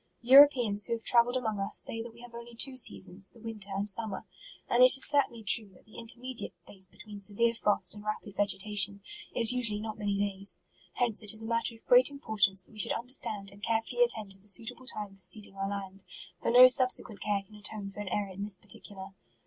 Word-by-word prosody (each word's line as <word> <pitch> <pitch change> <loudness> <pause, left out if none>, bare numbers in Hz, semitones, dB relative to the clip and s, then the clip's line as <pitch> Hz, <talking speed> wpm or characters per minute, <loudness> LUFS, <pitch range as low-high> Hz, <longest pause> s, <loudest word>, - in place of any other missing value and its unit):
Europeans 245 -6 +5
who - - -2
have 230 -1 -5
travelled 245 +1 +2
among 220 -5 -4
us, 195 - -2
say 225 - 0
that 230 +1 -9
we 235 +1 -18
have 245 -1 -14
only 235 0 -11
two 260 +3 -2
seasons, 195 -5 +3
the 235 - -19
winter 215 -3 -8
and 195 +1 -3
summer. 210 -1 -5 0.4
And 240 - +1
it 255 - +9
is - - +3
certainly 280 -6 0
true, 210 0 +3
that - - -22
the 220 - -13
intermediate 245 +2 -5
space 190 -2 -9
between 205 -1 -12
severe 220 +4 +1
frost 210 -2 0
and 210 -1 -12
rapid 215 -1 -6
vegetation, 200 0 +1 0.3
is 235 0 +6
usually 230 -5 +1
not 215 0 -7
many 205 -1 -2
days. 200 -1 +3 0.3
Hence 235 -3 0
it 210 0 0
is 220 - -13
a - - -7
matter 230 0 -2
of 225 - -22
great 250 0 +5
impor 250 -8 -1
tance 190 0 +2
that - - -23
we 215 - -14
should - - -1
understand 225 -5 -3
and 200 +1 -18
care 225 +1 -1
fully 240 +1 -5
attend 220 -4 -3
to 195 - -8
the 200 - -24
suitable 230 +4 +1
time 205 -5 -4
for 195 - -23
seeding 205 0 -1
our 195 0 -4
land, 195 -1 -7 0.4
for - - -2
no 250 +2 +8
subsequent 255 -4 0
care 200 -1 -2
can 210 - -23
atone 210 -1 -4
for 200 - -13
an 205 -2 -6
error 200 +1 -3
in 195 - -9
this 205 -2 0
particular. 195 -2 -10
215 Hz, 230 wpm, -29 LUFS, 200-235 Hz, 0.4 s, it